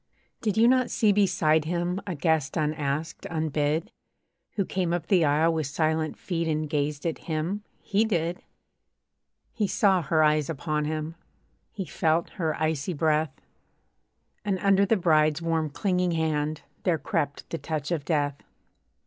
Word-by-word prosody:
Did 215 -2 -1
you 230 +1 +6
not 255 0 +3
see 215 -2 +3
beside 160 -6 +3
him 175 +3 -1
A 180 - -2
guest 155 -2 0
unasked, 150 0 -2
unbid? 155 0 -1 0.6
Who 195 - 0
came 180 -3 -1
up 175 -2 -1
the 180 -3 +3
aisle 155 +3 +3
with 155 -3 -1
silent 155 +1 0
feet 170 -3 -2
And 155 -1 0
gazed 145 0 -2
at 165 - -1
him? 165 +7 -2 0.2
he 210 +1 +1
did! 175 -5 -1 1.1
He 210 -3 0
saw 190 -2 +3
her 155 +1 +2
eyes 150 -1 +2
upon 150 0 -1
him, 155 +1 -3 0.6
He 195 -4 -5
felt 160 +4 0
her 160 -2 0
icy 155 +1 -1
breath; 155 -2 0 1.0
And 200 -2 0
under 200 0 +4
the 225 - +3
bride's 155 -4 +3
warm 165 -2 0
clinging 180 +2 0
hand 155 -1 -1 0.2
There 175 -4 +1
crept 145 0 -2
the 165 - -3
touch 150 +1 -3
of 160 -4 -1
death. 145 -3 0
160 Hz, 150 wpm, -27 LUFS, 150-180 Hz, 1.1 s, you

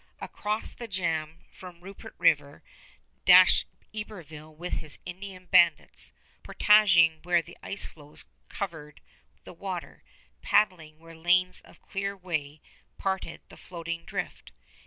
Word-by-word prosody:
Across 210 +1 -3
the 235 - -8
jam 165 -5 -3
from 180 -2 -12
Rupert 195 +2 -11
River - - +2 0.6
dashed - - +7 0.3
Iberville 165 -8 -8
with 175 +3 -4
his 155 -2 -10
Indian 185 0 -8
bandits, 170 -3 +3 0.3
portaging 170 -7 +5
where 175 -1 +2
the 170 - -13
ice 200 - -3
floes 150 -1 -4 0.2
covered 160 -6 -6 0.4
the - - -11
water, - - -6 0.4
paddling 160 -7 +1
where 165 +1 -14
lanes 180 +2 +2
of - - -20
clear 200 0 -4
way 155 -5 -4 0.4
parted 190 -1 -3
the - - -14
floating 165 -1 -6
drift. - - -6
175 Hz, 120 wpm, -28 LUFS, 160-190 Hz, 0.6 s, dashed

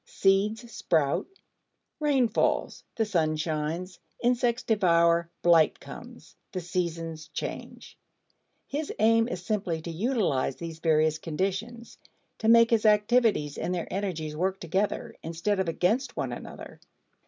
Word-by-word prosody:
Seeds 210 +5 +1
sprout, 150 -8 +1 0.7
rain 280 -5 +3
falls, 220 - 0
the 225 - +1
sun 160 -6 +1
shines, 160 +3 -3 0.2
insects 245 0 +1
devour, 170 -5 +3
blight 165 -3 +4
comes, - - -12 0.2
the 185 - -2
seasons 165 -2 -3
change. 160 - -7 0.7
His 295 +2 -4
aim 225 +1 +4
is 180 -7 -6
simply 195 -7 -1
to 170 - -5
utilize 175 - 0
these 165 -1 -7
various 155 -1 +2
conditions; 195 +8 -4 0.4
to 220 - -1
make 230 0 +6
his 220 -1 +3
activities 210 - +3
and 180 - -1
their 170 - -5
energies 170 -6 -3
work 190 +4 -1
together, 190 +5 -2
instead 170 +5 -2
of 190 - 0
against 230 - 0
one - - -2
another. - - -10
185 Hz, 130 wpm, -27 LUFS, 165-225 Hz, 0.7 s, make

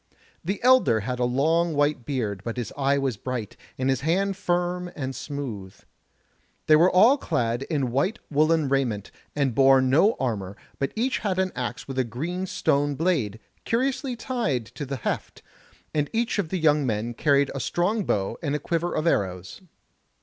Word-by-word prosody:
The 195 +4 -2
elder 250 - +5
had 125 +4 -3
a 125 - +2
long 160 +6 +1
white 145 -4 +1
beard, 110 -9 -2
but 115 +2 -4
his 120 - -4
eye 140 0 +2
was 135 -6 -1
bright, 120 -2 -5 0.2
and 130 - -1
his 135 -2 +1
hand 190 +6 +1
firm 180 -1 -1
and 135 -2 -4
smooth. 110 -10 -6 0.9
They 155 - +6
were 170 +4 +6
all 230 +11 +5
clad 120 - -1
in 140 -7 0
white 165 - 0
woollen 155 +1 +3
raiment, 125 -7 -1 0.2
and 140 -4 +1
bore 135 +2 +6
no 140 - +4
armour, 100 -6 -3 0.2
but 135 - -1
each 250 +4 0
had 190 -3 -1
an 190 0 +1
axe 125 -3 -4
with 135 -1 -3
a - - +3
green 165 - -4
stone 145 -4 +1
blade, 135 - 0 0.2
curiously 255 +2 -1
tied 225 - -2
to 145 - -6
the 135 - -3
heft, 125 - -4 0.5
and 145 -2 0
each 230 -1 0
of 175 -6 -1
the 190 - -1
young 150 -3 +3
men 115 -1 -2
carried 140 +2 +2
a 135 - -4
strong 200 +9 0
bow 95 - -1
and 145 -3 -1
a - - -1
quiver 170 +3 -2
of 155 - -1
arrows. 95 - -1
140 Hz, 180 wpm, -25 LUFS, 125-175 Hz, 0.9 s, They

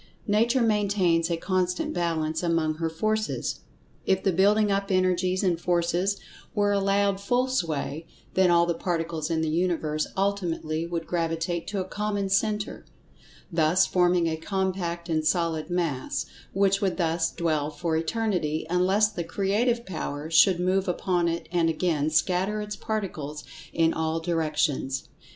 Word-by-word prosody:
Nature 235 +4 +2
maintains 200 -6 +2
a 170 - 0
constant 180 0 -1
balance 160 -2 -1
among 165 -3 +1
her 165 0 -1
Forces. 215 +6 -1 0.5
If 190 0 +2
the 195 - +3
building 205 +3 +3
up 195 +1 0
energies 185 0 +1
and 175 -3 +1
forces 175 +3 +1 0.4
were 205 0 +2
allowed 200 0 +1
full 245 +5 +1
sway, 165 - -2 0.3
then 185 -1 +4
all 170 0 +5
the 170 - 0
Particles 165 -2 -2
in 165 -1 0
the 160 - 0
Universe 160 -2 0
ultimately 170 -5 -1
would 170 -1 -3
gravitate 165 0 -2
to 200 - -2
a 185 - -5
common 205 -1 -2
centre, 210 +2 0 0.7
thus 165 +2 +3
forming 180 -1 +2
a 160 -1 -1
compact 180 -1 -2
and 160 -2 0
solid 165 -1 0
Mass, 165 -7 -1 0.3
which 195 0 +2
would 195 -2 0
thus 165 -2 +1
dwell 155 -4 -1
for 160 +1 -2
Eternity, 165 -3 -1
unless 190 +4 +3
the 175 -5 -4
Creative 210 +7 0
Power 155 -3 -5
should 175 +2 +5
move 185 +2 +1
upon 180 -1 0
it 170 0 -2
and 170 -2 +2
again 160 -2 0
scatter 185 +6 +1
its 210 0 -4
Particles 160 -9 -4 0.3
in[Pg 165 -1 +2
110] - - -3
all 160 0 -1
directions. 155 -5 -1
175 Hz, 150 wpm, -26 LUFS, 165-195 Hz, 0.7 s, all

